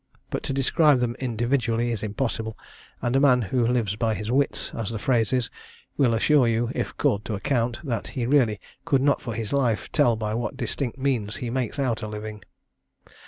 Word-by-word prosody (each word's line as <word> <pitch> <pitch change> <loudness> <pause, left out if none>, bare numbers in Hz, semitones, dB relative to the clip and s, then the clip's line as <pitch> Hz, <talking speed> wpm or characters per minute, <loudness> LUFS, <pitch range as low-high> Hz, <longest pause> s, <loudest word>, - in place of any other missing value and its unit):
But - - -2
to - - +1
describe 140 +1 +4
them 120 -1 -1
individually 120 -1 0
is 110 -3 -3
impossible; 110 0 -3 0.5
and 120 +1 +1
a - - +5
man 135 -3 +5
who 120 +3 +1
lives 115 -5 +1
by 110 0 0
his 105 +2 -4
wits, 140 +2 0
as 115 -4 -3
the 115 - -3
phrase 115 -1 +1
is, 125 -2 0 0.4
will 120 -5 +3
assure 135 +2 +4
you, 115 +1 +1
if - - -3
called 105 +1 +1
to 110 - -2
account, 120 +2 0
that 115 -8 -3
he 120 - 0
really 120 -6 +3 0.2
could 135 -2 +2
not 145 0 +3
for 115 -3 -5
his 110 0 -4
life 125 -6 0
tell 130 -7 +4
by 110 -1 -3
what 120 +3 -3
distinct 125 0 -3
means 125 -6 -1
he 120 -2 -4
makes 130 0 -2
out 130 -5 0
a 110 - -4
living. 105 0 -6
120 Hz, 200 wpm, -25 LUFS, 110-130 Hz, 0.5 s, a